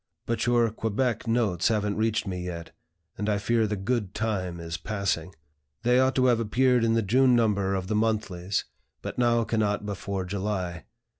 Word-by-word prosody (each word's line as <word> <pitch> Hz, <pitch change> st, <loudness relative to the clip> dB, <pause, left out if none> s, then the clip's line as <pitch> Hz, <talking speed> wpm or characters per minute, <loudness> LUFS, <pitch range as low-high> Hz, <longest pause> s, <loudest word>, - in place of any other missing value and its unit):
But 115 Hz, 0 st, -1 dB
your 120 Hz, -2 st, +3 dB
Quebec 115 Hz, +2 st, -1 dB
notes 110 Hz, -7 st, +1 dB
haven't 105 Hz, -2 st, 0 dB
reached 110 Hz, 0 st, 0 dB
me 90 Hz, -2 st, -4 dB
yet, 85 Hz, -2 st, -6 dB, 0.5 s
and 105 Hz, 0 st, -1 dB
I 105 Hz, -, +2 dB
fear 110 Hz, +2 st, +1 dB
the 105 Hz, -, -1 dB
'good 105 Hz, 0 st, -2 dB
time' 95 Hz, -6 st, -2 dB
is 85 Hz, 0 st, -5 dB
passing. 95 Hz, -5 st, -2 dB, 0.5 s
They 125 Hz, +1 st, +4 dB
ought 130 Hz, +1 st, +3 dB
to 130 Hz, -, +3 dB
have 120 Hz, -2 st, +4 dB
appeared 125 Hz, +2 st, +2 dB
in 115 Hz, 0 st, +3 dB
the 115 Hz, -, +2 dB
June 125 Hz, +5 st, +4 dB
number 100 Hz, -4 st, +2 dB
of 95 Hz, -1 st, -2 dB
the 105 Hz, -, -2 dB
monthlies, 105 Hz, -4 st, -1 dB, 0.4 s
but -, -, -5 dB
now 120 Hz, -1 st, +3 dB
cannot 105 Hz, -2 st, 0 dB
before 100 Hz, -1 st, -3 dB
July. 95 Hz, -4 st, -3 dB
105 Hz, 175 wpm, -27 LUFS, 95-115 Hz, 0.5 s, They